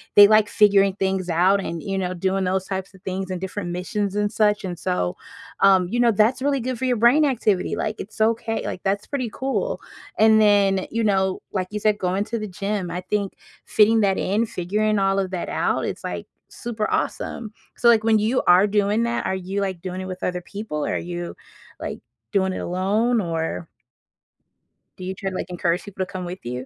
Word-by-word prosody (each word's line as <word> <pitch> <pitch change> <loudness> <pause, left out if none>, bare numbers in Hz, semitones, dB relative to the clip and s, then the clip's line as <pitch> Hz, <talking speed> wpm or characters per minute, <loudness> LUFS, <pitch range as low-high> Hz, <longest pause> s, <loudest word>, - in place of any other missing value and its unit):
they 205 0 +10
like 215 0 +4
figuring 200 -2 +4
things 190 -2 -1
out 180 +4 +3
and, 165 -1 -4
you 195 -1 -2
know, 180 -1 -2
doing 190 +2 0
those 190 +1 0
types 190 0 -4
things 190 0 -3
and 185 - -3
different 190 -1 -4
missions 195 +3 -2
and 205 0 0
such, 210 -1 +2
and 180 -2 -4
so, 180 - -1 0.4
um, 190 -2 +5
you 240 - -1
know, 240 -1 +5
that's 220 +5 +2
really 280 0 +1
good 255 0 -3
for 260 - -1
your 250 -1 +1
brain 245 +7 +5
activity. 215 -8 +1
Like, 215 0 -2
it's 210 - -9
okay, 225 0 +1
like, 185 - -4
that's 200 +1 0
pretty 255 -5 -2
cool. 270 - -2 0.4
And 220 0 +6
then, 200 -2 +3
you 230 0 0
know, 190 -2 +1
like 185 -2 -2
you 210 - -3
said, 210 0 +2
going 185 +2 0
to 230 +1 -3
the 215 - -4
gym. 195 0 -3
I 180 - -3
think 200 +1 -2 0.3
fitting 220 +1 +4
that 195 -2 +2
in, 215 +4 +1
figuring 210 +3 0
all 195 0 +2
of 190 -1 -2
that 180 - -3
out, - - 0
it's, - - -5
like, - - -4 0.2
super 225 -3 -4
awesome. 220 -3 -2 0.3
So 240 - +2
like, 225 -2 +5
when 220 -1 +4
you 225 +5 +1
are 180 +3 +7
doing 205 +2 +1
that, 235 0 -1
are 190 - 0
you, 190 +2 -3
like, 190 -4 -3
doing 185 0 -5
it - - -5
with 185 -1 -7
other 180 0 -1
people? 175 -5 -5
Are - - -1
you, 175 0 -5 0.5
like, - - -5 0.3
doing 190 -2 +1
it - - -4
alone? 210 +7 +1
Or 165 -1 -3 1.3
do 185 - -9
you 190 +1 -4
try 195 +1 -3
to, 185 - -7
like, 185 - -4
encourage 175 0 -1
people 190 -2 -4
to 185 - -15
come 185 -2 -5
with 180 +2 -6
you? 125 +2 -5
195 Hz, 210 wpm, -23 LUFS, 185-215 Hz, 1.3 s, they